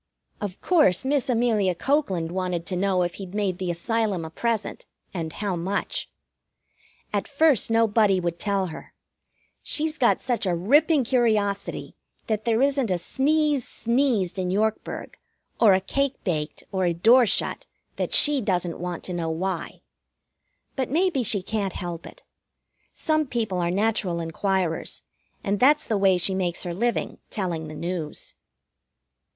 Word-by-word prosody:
Of 200 -3 -5
course, 295 - +4
Miss 275 -1 +1
Amelia 225 -6 +2
Cokeland 190 - 0
wanted 180 -2 -2
to 185 - -2
know 185 0 +1
if 175 0 -2
he'd 190 0 -8
made 200 -3 -1
the 185 -1 -2
Asylum 195 0 -1
a 160 - -8
present, 230 +3 -2 0.3
and 165 -4 -4
how 200 +2 -2
much. 185 +4 -2 1.0
At 205 - -1
first 290 -5 +3
nobody 220 -3 +3
would 170 -1 -3
tell 200 -2 0
her. - - -11 0.7
She's 315 0 -1
got 240 - +3
such 240 -5 -1
a 175 - +1
ripping 285 - +3
curiosity 215 -5 0 0.3
that 215 -1 -2
there 230 +2 +2
isn't 275 -4 +2
a 180 - +1
sneeze 285 - +1
sneezed 235 -7 0
in 180 -1 -1
Yorkburg, 215 +3 -2 0.4
or 215 -4 +6
a 190 - +4
cake 275 +8 -1
baked, 155 -5 -3
or 190 -1 0
a 170 -1 +1
door 235 +7 +5
shut - - 0 0.3
that - - -2
she 295 -2 +5
doesn't 180 -4 -1
want 175 -1 -5
to 180 - -5
know 170 -2 -2
why. 175 +2 -3 0.9
But 260 -3 -2
maybe 335 -1 +1
she 215 -5 0
can't 200 -2 -2
help 175 -2 -5
it. - - -14 0.7
Some 310 -1 +1
people 220 -7 -2
are 170 -1 0
natural 195 -2 0
inquirers, 170 +1 -1 0.4
and 200 0 -1
that's 290 +4 +4
the 220 - -1
way 195 -2 +4
she 185 +2 +2
makes 180 -2 -2
her 175 -2 -4
living, 235 +6 -1
telling 175 -6 -3
the 155 - -8
news. 170 -2 -5
200 Hz, 155 wpm, -25 LUFS, 180-240 Hz, 1.0 s, or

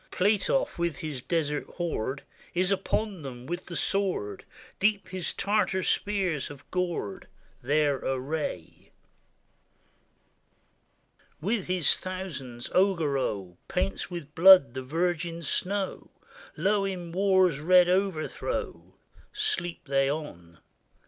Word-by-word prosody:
Platoff, 210 - +1
with 170 -4 0
his 150 -5 -5
desert 150 -2 -1
horde, 140 -6 -2 0.3
Is 185 +2 +2
upon 195 0 -1
them 125 -3 -8
with 175 +5 -5
the 170 - -6
sword; 190 - -1 0.3
Deep 205 0 +1
his 185 -2 -2
Tartar 200 -2 +1
spears 190 -9 0
have 145 -2 -11
gored 180 +1 -2 0.3
Their 145 +1 +2
array. 130 - -4 2.5
With 200 +5 -1
his 180 -3 +2
thousands, 160 -11 -5
Augereau 140 - +1
Paints 185 +2 -2
with 170 -5 -7
blood 180 -6 +8
the 130 - -4
virgin 170 +4 -1
snow; 190 +6 -1 0.5
Low 200 +4 +2
in 180 -3 -4
war's 185 -4 +3
red 180 +3 +6
overthrow 190 - -2 0.4
Sleep 420 - -2
they 135 0 +2
on! 90 - -6
175 Hz, 105 wpm, -28 LUFS, 145-190 Hz, 2.5 s, blood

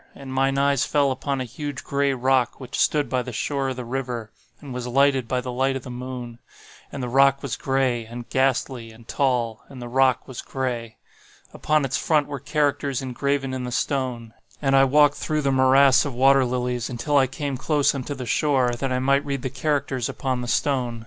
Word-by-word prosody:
And 135 -1 -8
mine 135 +1 +1
eyes 140 -2 +2
fell 140 -2 +2
upon 135 +1 -2
a - - -1
huge 140 +3 -6
gray 140 0 0
rock 130 -1 +1
which 130 -1 -6
stood 150 -1 +2
by 130 - 0
the 125 - -6
shore 135 +4 -2
of 130 - -3
the 125 -1 -6
river, 120 -3 -4 0.3
and 140 -4 -9
was 125 0 -4
lighted 135 0 +2
by 125 0 -1
the 125 0 -5
light 135 +2 0
of 135 - -5
the 125 - -8
moon. 125 -1 -7 0.5
And 140 - -5
the - - -2
rock 135 +2 +3
was 130 -6 -2
gray, 130 -4 0
and 120 +1 -8
ghastly, 130 -2 0
and 110 +1 -17
tall,—and 125 -1 -1
the 120 - -6
rock 130 +1 +2
was 130 - -7
gray. 120 -4 -4 0.6
Upon 155 -2 +1
its 135 +1 -1
front 150 0 +2
were 145 -1 -6
characters 140 -1 -1
engraven 135 +1 -1
in 130 -1 -3
the 125 - -4
stone; 120 -3 -2 0.3
and 135 -2 +2
I 135 0 +6
walked 145 +1 +4
through 155 -1 -1
the 140 - +2
morass 135 +1 +5
of 140 -4 -5
water 135 +1 +5
lilies, 125 -1 -2
until 125 +4 -2
I 135 -2 +5
came 140 +1 -4
close 145 +2 +1
unto 140 +1 -4
the 130 -2 -6
shore, 130 -1 +2
that 130 +2 -3
I 125 - +1
might 140 +2 +2
read 140 -3 -4
the 130 - -3
characters 135 -3 -1
upon 130 -3 -2
the 120 - -5
stone. 125 -3 0
130 Hz, 210 wpm, -23 LUFS, 125-140 Hz, 0.6 s, I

